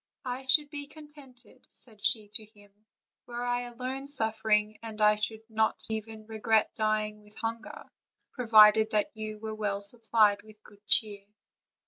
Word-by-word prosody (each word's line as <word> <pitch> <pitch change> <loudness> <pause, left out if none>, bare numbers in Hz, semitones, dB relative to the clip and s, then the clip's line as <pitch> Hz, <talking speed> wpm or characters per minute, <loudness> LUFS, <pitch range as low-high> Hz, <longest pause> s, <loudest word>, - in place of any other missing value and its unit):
"I 255 +1 -5
should 295 +2 +3
be 290 -1 -6
contented," 285 -6 -16
said 215 -5 -13
she 215 -2 +1
to 215 +1 +3
him, 205 -1 -21 0.5
"were 240 0 -5
I 245 0 0
alone 255 +3 -6
suffering, 220 -4 0
and 220 -1 -8
I 210 0 +5
should 220 +1 -3
not 220 -1 0
even 220 0 -6
regret 220 0 +1
dying 215 -1 -1
with 210 0 -15
hunger, 225 0 -5 0.5
provided 220 -3 +6
that 210 -1 +1
you 215 -1 -6
were 220 0 -6
well 205 -2 -3
supplied 215 -1 +2
with 215 0 -18
good 205 0 -19
cheer." 205 -3 +1
220 Hz, 150 wpm, -29 LUFS, 210-240 Hz, 0.5 s, provided